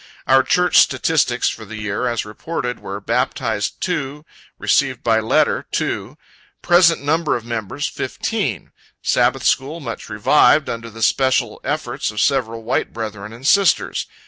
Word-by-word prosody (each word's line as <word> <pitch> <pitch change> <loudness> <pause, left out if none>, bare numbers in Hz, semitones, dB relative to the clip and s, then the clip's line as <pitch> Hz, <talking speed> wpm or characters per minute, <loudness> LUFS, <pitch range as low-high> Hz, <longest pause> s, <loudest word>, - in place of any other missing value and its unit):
Our 135 0 +5
church 180 +6 +2
statistics 135 -6 +2
for 110 - -3
the 110 +1 -9
year, 105 +3 -2
as 120 -3 -2
reported, 125 +3 -5
were: 100 +1 -6
Baptized, 115 -1 -1
2; 150 -4 -3 0.3
Received 130 -3 +1
by 115 -1 +3
letter, 110 0 +1
2; - - -2 0.5
Present 175 -3 +4
number 155 +1 +1
of 115 - -11
members, 115 -4 -3
15.... - - -3 0.3
Sabbath - - +2
school 145 +5 0
much 120 -7 -7
revived, 145 +7 +4
under 115 0 -5
the 115 0 -6
special 130 -4 +1
efforts 140 -4 -2
of 105 -1 -5
several 115 -3 0
white 120 +3 -1
brethren 105 -2 -6
and 120 +3 -11
sisters. 195 +3 +2
125 Hz, 145 wpm, -19 LUFS, 110-145 Hz, 0.5 s, Our